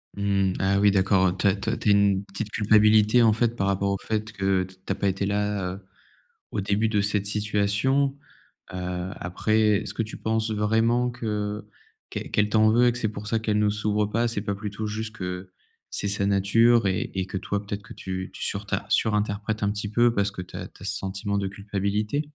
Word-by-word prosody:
Mmh, 100 -2 +1
ah 95 +1 +2
oui 105 0 +5
d'accord, 95 -1 +3
heu, 90 +2 -1
tu - - +2
as 100 - +3
tu 100 +3 -4
as 115 - -1
tu 105 - 0
as - - +7
une 100 -1 +3
petite 100 +2 -5
culpabilité, 110 +2 +4
en 110 - +5
fait, 115 +1 0
par 100 -3 -1
rapport 100 0 +1
au 100 - 0
fait 110 +2 -3
que 95 -2 +1
tu 95 0 -11 0.2
as - - +1
pas 100 - -1
été 95 +1 -1
là, 100 -2 -1
heu, 95 - -9 0.7
au - - -2
début 100 +3 +1
de 105 -2 +2
cette 100 -1 0
situation, 105 +7 +1 0.6
heu, 90 0 -4
après, 100 +5 0 0.3
est - - -10
ce - - -5
que 115 - -1
tu 110 - -8
penses 110 0 -1
vraiment 115 +3 +2
que 105 -3 -3 0.4
qu'elle - - -6
qu'elle 105 0 +2
t'en 110 0 +4
veut 120 +2 +4
et - - +4
que 120 - -6
c'est 110 -3 -1
pour 105 0 -7
ça 115 +1 +1
qu'elle 105 -1 0
ne 105 -1 +3
s'ouvre 105 0 0
pas? 115 +3 0
C'est 110 -3 -2
pas 100 -1 -2
plutôt 105 +1 -5
juste 110 +1 -5
que 90 0 -5 0.4
c'est 100 - -2
sa 100 0 0
nature 100 +3 +4
et 95 -1 -1
et 95 -1 -1
que 95 - -4
toi 100 +2 -3
peut-être 100 0 -5
que - - -11
tu 95 0 -5
tu - - -6
surtin - - -2
surinterprètes 105 0 0
un 100 - +2
petit 105 0 -4
peu 120 +2 +3
parce 100 -1 0
que 90 - -6
tu 90 - -11
as - - -6
tu - - -21
as - - -7
ce - - -1
sentiment 100 +1 -3
de 100 - -1
culpabilité? 100 +5 -2
105 Hz, 230 wpm, -25 LUFS, 100-110 Hz, 0.7 s, as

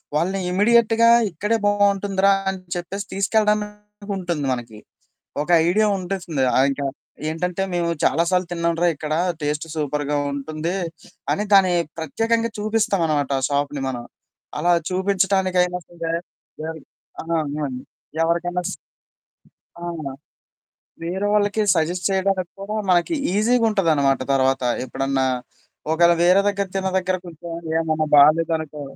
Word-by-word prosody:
వాళ్ళని 185 +5 0
ఇమ్మీడియేట్‌గా 225 +4 +4 0.2
ఇక్కడే 210 +7 0
బావుంటుందిరా 200 -1 +2 0.2
అని 190 0 -4 0.2
చెప్పేసి 190 +4 -5
తీసుకెళ్లడానికుంటుంది 210 -4 -1
మనకి. 115 -3 -7 0.6
ఒక 150 - -7 0.2
ఐడియా 215 +5 +3
ఉంటుంది. 175 -7 -2
ఆ! - - +5
ఇంక 140 +1 -4 0.5
ఏంటంటే 180 +3 -2
"మేము 170 -1 0 0.2
చాలా 160 +5 +3
సార్లు 185 -1 +1
తిన్నాంరా 170 0 0
ఇక్కడ. 150 +1 -5 0.3
టేస్టు 150 +2 -2
సూపర్‌గా 150 -1 -1 0.2
ఉంటుంది" 155 +5 -3 0.6
అని 205 - -1
దాన్ని 190 -2 +6 0.3
ప్రత్యేకంగా 225 +9 0
చూపిస్తామనమాట 195 - 0
ఆ - - -2
షాప్‌ని 145 0 -1
మనం. 120 -2 -4 0.5
అలా 175 +3 +3 0.2
చూపిచ్చటానికైనా 185 -1 +1
సరే 165 -1 -4 0.5
దానికి 160 -2 -7 0.4
ఆ! - - -13
అవునండి. 145 -4 -3 0.4
ఎవ్వరికైనా 175 +2 0
స్ - - -4 1.1
అవును. 160 -6 -5 0.9
వేరే 185 +4 -2
వాళ్ళకి 210 +1 +2
సజెస్ట్ 175 +2 0
చేయడానికి 190 -2 0
కూడా 205 +2 -4
మనకి 175 - +2 0.2
ఈజీగుంటదనమాట 205 - +2
తర్వాత. 135 0 +2 0.2
ఎప్పుడన్నా 135 0 -1 0.7
ఒకవేళ 170 +1 +5
వేరే 180 +3 +5
దగ్గర 200 -1 -1
తిన్న 190 0 0
దగ్గర 185 0 0
కొంచం 170 0 -9 0.3
ఏదన్నా 155 -1 0
బాలేదనుకో 155 0 +3
175 Hz, 115 wpm, -22 LUFS, 155-200 Hz, 1.1 s, దాన్ని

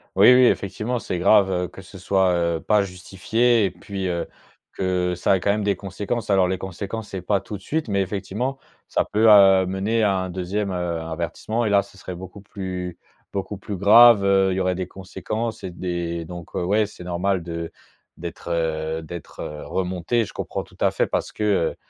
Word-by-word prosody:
Oui, 100 +6 +8
oui, 125 0 +6
effectivement, 110 +3 0
c'est 90 -6 -3
grave, 100 +1 +5
heu, 90 -1 -1
que 95 +2 -12
ce 95 +1 -12
soit, 95 0 +2
heu, 85 -1 0
pas 105 -1 +3
justifié 100 +5 +1
et - - +1
puis, 95 +2 -5
heu, 85 -1 -2 0.5
que 90 -1 0
ça 90 - +2
a 95 - +2
quand 100 - +1
même 105 +1 -1
des 100 -1 +1
conséquences. 100 +4 -4
Alors 95 -2 +4
les 95 +1 -1
conséquences 100 +4 -6
c'est 95 - -5
pas 100 +2 +1
tout 105 +1 -7
de 100 - -18
suite, 155 - -2
mais 100 -1 +1
effectivement, 105 +7 -3 0.3
ça - - +1
peut 110 +1 +3
amener 95 +2 +5
à 100 -2 +2
un 95 0 -3
2e 95 +3 -2
heu, 90 -2 -2
avertissement 85 +8 -3
et - - +1
là 100 -1 +4
ce 100 - -18
serait 90 - -7
beaucoup 95 +2 -10
plus 90 -3 -6 0.4
beaucoup 100 +1 -4
plus 100 +1 -6
grave, 110 +2 +7
heu, 95 -1 +3
Il 95 - -1
y - - -1
aurait 90 0 +1
des 95 0 -4
conséquences 110 +4 -5
et - - -4
des 85 -1 -3
donc 85 0 -9
heu, - - -1
ouais 105 +4 +2
c'est 90 - -12
normal 90 +1 -1
de 85 -1 -5 0.5
d'être, 85 0 -7
heu, 80 -1 -1
d'être, 85 0 -9
heu, 75 0 -6
remontée, 95 +5 -1
je - - -11
comprends - - -4
tout - - -20
à - - +4
fait - - +1
parce - - -2
que, 105 - -4
heu, 100 -6 +1
95 Hz, 210 wpm, -23 LUFS, 90-105 Hz, 0.5 s, Oui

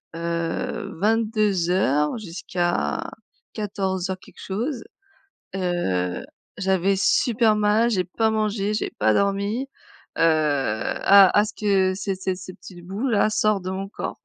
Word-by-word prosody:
heu, 170 +6 -3
22:00 195 - +1
jusqu'à 175 -2 -2 0.5
14:00 190 -3 -3
quelque - - -18
chose. 230 +6 -3 0.7
Heu. 95 - -1 0.3
J'avais 190 0 +1
super 225 +2 +3
mal, 210 +2 +3
j'ai 190 -6 +1
pas 220 +5 0
mangé, 215 -1 -1
j'ai 215 - -2
pas 110 0 +3
dormi. 200 - 0 0.5
Heu. - - 0
A 155 - +4
a 210 - +5
ce 210 - -7
que 195 -3 +2
ces 195 0 -3
ces 185 0 -2
cette 185 0 -10
petit 175 -2 -12
bout 195 +9 -4
là 215 -3 +3
sort 215 -1 +1
de 185 - -5
mon 195 +1 -4
corps. - - -6
195 Hz, 130 wpm, -23 LUFS, 180-215 Hz, 0.7 s, a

